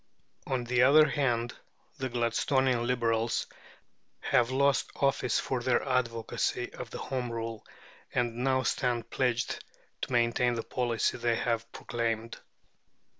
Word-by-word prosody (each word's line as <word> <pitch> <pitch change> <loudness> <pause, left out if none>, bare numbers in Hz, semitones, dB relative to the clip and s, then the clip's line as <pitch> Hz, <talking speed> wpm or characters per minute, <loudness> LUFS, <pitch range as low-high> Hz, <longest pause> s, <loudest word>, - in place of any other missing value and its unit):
On 130 -2 -1
the 120 0 +1
other 150 +4 +7
hand, 120 -4 0 0.5
the 130 -1 -2
Gladstonian 120 +1 +1
Liberals 115 -2 +1 0.8
have 120 -1 +2
lost 135 -2 +2
office 135 -3 +1
for 130 -2 -2
their 125 +2 +1
advocacy 120 -3 -1
of - - -8
Home 125 -2 -3
Rule, 115 -1 -4 0.5
and 120 -2 0
now 130 +1 +1
stand 120 -2 -1
pledged 125 -2 0 0.4
to - - -3
maintain 120 0 +2
the 115 - -3
policy 120 -2 -1
they 120 -1 +1
have 115 -1 -1
proclaimed. 115 -1 -3
120 Hz, 125 wpm, -30 LUFS, 115-130 Hz, 0.8 s, other